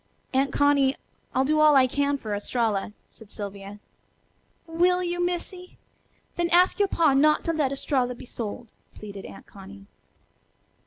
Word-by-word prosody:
"Aunt 270 Hz, +1 st, +1 dB
Connie, 285 Hz, -2 st, +3 dB, 0.4 s
I'll 260 Hz, +1 st, +2 dB
do 305 Hz, +2 st, +1 dB
all 305 Hz, -1 st, +6 dB
I 265 Hz, -1 st, +6 dB
can 285 Hz, +2 st, 0 dB
for 215 Hz, -6 st, -5 dB
Estralla," 210 Hz, -1 st, -2 dB, 0.2 s
said 220 Hz, -3 st, -16 dB
Sylvia. 200 Hz, -1 st, -8 dB, 0.9 s
"Will 355 Hz, +2 st, +1 dB
you, 350 Hz, 0 st, -2 dB
Missy? 360 Hz, +1 st, -5 dB, 0.6 s
Then 345 Hz, 0 st, 0 dB
ask 360 Hz, +4 st, +3 dB
yo' 405 Hz, -, +3 dB
pa 325 Hz, -6 st, +2 dB
not 300 Hz, +3 st, +3 dB
to 330 Hz, -, -1 dB
let 295 Hz, -4 st, 0 dB
Estralla 260 Hz, -2 st, -1 dB
be -, -, -12 dB
sold," 235 Hz, 0 st, -7 dB, 0.2 s
pleaded 200 Hz, -2 st, -9 dB
Aunt -, -, -13 dB
Connie. 195 Hz, 0 st, -13 dB
275 Hz, 150 wpm, -25 LUFS, 220-330 Hz, 0.9 s, all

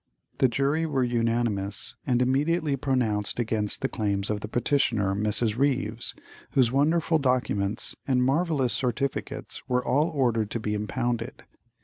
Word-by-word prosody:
The 130 Hz, -, +5 dB
jury 140 Hz, +6 st, 0 dB
were 135 Hz, -4 st, 0 dB
unanimous, 115 Hz, -4 st, -1 dB
and 125 Hz, -1 st, +3 dB
immediately 145 Hz, +4 st, +1 dB
pronounced 120 Hz, -7 st, 0 dB
against 110 Hz, -3 st, -1 dB
the -, -, +3 dB
claims 100 Hz, -4 st, -1 dB
of 105 Hz, -, -1 dB
the 110 Hz, -, -6 dB
petitioner, 115 Hz, -5 st, +1 dB
Mrs. 105 Hz, +2 st, +1 dB
Ryves, 125 Hz, -4 st, 0 dB, 0.4 s
whose 125 Hz, -4 st, +4 dB
wonderful 160 Hz, +4 st, +2 dB
documents 120 Hz, -6 st, +1 dB
and 125 Hz, -2 st, +2 dB
marvellous 140 Hz, -3 st, +1 dB
certificates 135 Hz, +3 st, -2 dB
were 125 Hz, 0 st, +1 dB
all 145 Hz, +4 st, +3 dB
ordered 120 Hz, -8 st, 0 dB
to 115 Hz, -, -3 dB
be 105 Hz, -1 st, -2 dB
impounded. 120 Hz, +3 st, -3 dB
125 Hz, 135 wpm, -26 LUFS, 110-135 Hz, 0.4 s, The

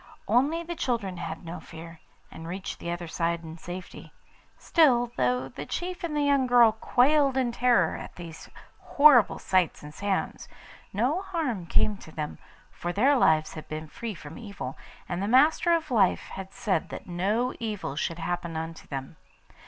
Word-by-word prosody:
Only 285 Hz, +9 st, +2 dB
the 340 Hz, +1 st, -5 dB
children 225 Hz, -, -2 dB
had 175 Hz, -, -6 dB
no 170 Hz, +2 st, -6 dB
fear, 165 Hz, 0 st, -11 dB, 0.3 s
and 160 Hz, -, -9 dB
reached 185 Hz, +3 st, -5 dB
the 170 Hz, -, -5 dB
other 175 Hz, 0 st, -4 dB
side 170 Hz, +1 st, -1 dB
in 160 Hz, +1 st, -9 dB
safety. 180 Hz, +2 st, -8 dB, 0.5 s
Still, 245 Hz, -8 st, +3 dB
though 125 Hz, 0 st, +1 dB
the 140 Hz, +3 st, -8 dB
chief 355 Hz, +1 st, -4 dB
and 325 Hz, -3 st, -2 dB
the 295 Hz, -, +2 dB
young 280 Hz, -2 st, +3 dB
girl 240 Hz, -2 st, +7 dB
quailed 265 Hz, +5 st, +3 dB
in 250 Hz, -2 st, +1 dB
terror 245 Hz, 0 st, +3 dB
at -, -, -9 dB
these 165 Hz, -2 st, -10 dB, 0.3 s
horrible 280 Hz, -7 st, +5 dB
sights 185 Hz, -5 st, +1 dB
and 150 Hz, 0 st, -9 dB
sounds, 200 Hz, +2 st, -2 dB, 0.4 s
no 255 Hz, -, +1 dB
harm 310 Hz, -, -3 dB
came 210 Hz, +4 st, +2 dB
to 160 Hz, -, -13 dB
them, 150 Hz, -1 st, -5 dB, 0.3 s
for 175 Hz, -, -4 dB
their 260 Hz, +10 st, +4 dB
lives 155 Hz, -, +3 dB
had 155 Hz, -, -9 dB
been 155 Hz, +1 st, -5 dB
free 225 Hz, +6 st, -6 dB
from 150 Hz, -1 st, -10 dB
evil, 200 Hz, -, -6 dB, 0.3 s
and 175 Hz, +1 st, -3 dB
the 200 Hz, -, -1 dB
Master 295 Hz, +8 st, +4 dB
of 325 Hz, -4 st, +1 dB
Life 205 Hz, -6 st, +2 dB
had 190 Hz, 0 st, -8 dB
said 195 Hz, -2 st, -1 dB
that -, -, -7 dB
no 205 Hz, +8 st, 0 dB
evil 210 Hz, -, -4 dB
should 165 Hz, +2 st, -2 dB
happen 170 Hz, -1 st, -3 dB
unto 160 Hz, 0 st, -6 dB
them. 135 Hz, -2 st, -6 dB
195 Hz, 175 wpm, -27 LUFS, 165-255 Hz, 0.5 s, girl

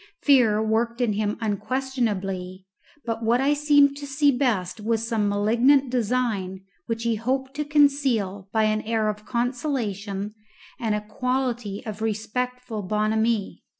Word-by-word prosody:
Fear 230 Hz, -7 st, +4 dB
worked 230 Hz, +2 st, 0 dB
in 240 Hz, -4 st, +1 dB
him 210 Hz, 0 st, -1 dB
unquestionably, 205 Hz, -5 st, -2 dB, 0.4 s
but 230 Hz, -1 st, -3 dB
what 235 Hz, +2 st, +3 dB
I 275 Hz, +2 st, +3 dB
seemed 290 Hz, -1 st, +4 dB
to 285 Hz, 0 st, -7 dB
see 285 Hz, +1 st, +3 dB
best 225 Hz, -7 st, 0 dB
was 225 Hz, +1 st, -1 dB
some 220 Hz, -3 st, +1 dB
malignant 240 Hz, +6 st, +3 dB
design 220 Hz, -6 st, -1 dB, 0.3 s
which 230 Hz, 0 st, -2 dB
he 230 Hz, -1 st, +1 dB
hoped 265 Hz, +4 st, -2 dB
to 300 Hz, -, 0 dB
conceal 270 Hz, -10 st, +2 dB
by 220 Hz, -1 st, +2 dB
an 215 Hz, 0 st, +1 dB
air 220 Hz, -1 st, 0 dB
of 210 Hz, 0 st, -6 dB
conciliation 225 Hz, -6 st, -2 dB, 0.5 s
and 220 Hz, -3 st, 0 dB
a 210 Hz, -, -2 dB
quality 245 Hz, -2 st, -2 dB
of 215 Hz, -1 st, -6 dB
respectful 225 Hz, +2 st, -3 dB
bonhomie. 215 Hz, +2 st, 0 dB
225 Hz, 140 wpm, -24 LUFS, 210-255 Hz, 0.5 s, Fear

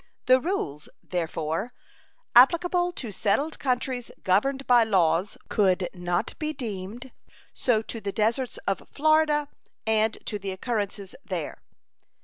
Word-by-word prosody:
The 255 Hz, +1 st, +6 dB
rules, 205 Hz, -, -3 dB
therefore, 165 Hz, +4 st, -2 dB, 0.6 s
applicable 350 Hz, +7 st, +5 dB
to 235 Hz, -9 st, -6 dB
settled 275 Hz, -, 0 dB
countries 250 Hz, -2 st, -1 dB
governed 265 Hz, +9 st, +2 dB
by 245 Hz, -2 st, +6 dB
laws 185 Hz, -2 st, +2 dB
could 190 Hz, -3 st, +2 dB
not 175 Hz, -1 st, -2 dB
be 310 Hz, -1 st, -2 dB
deemed 230 Hz, 0 st, -6 dB, 0.4 s
so 225 Hz, -3 st, +1 dB
to 225 Hz, 0 st, -6 dB
the 200 Hz, -, -3 dB
deserts 230 Hz, +5 st, 0 dB
of 195 Hz, -, -2 dB
Florida 305 Hz, -1 st, +3 dB, 0.4 s
and 220 Hz, 0 st, +2 dB
to 210 Hz, -, -3 dB
the 195 Hz, 0 st, -5 dB
occurrences 200 Hz, -2 st, -3 dB
there. -, -, -5 dB
225 Hz, 125 wpm, -26 LUFS, 195-265 Hz, 0.6 s, The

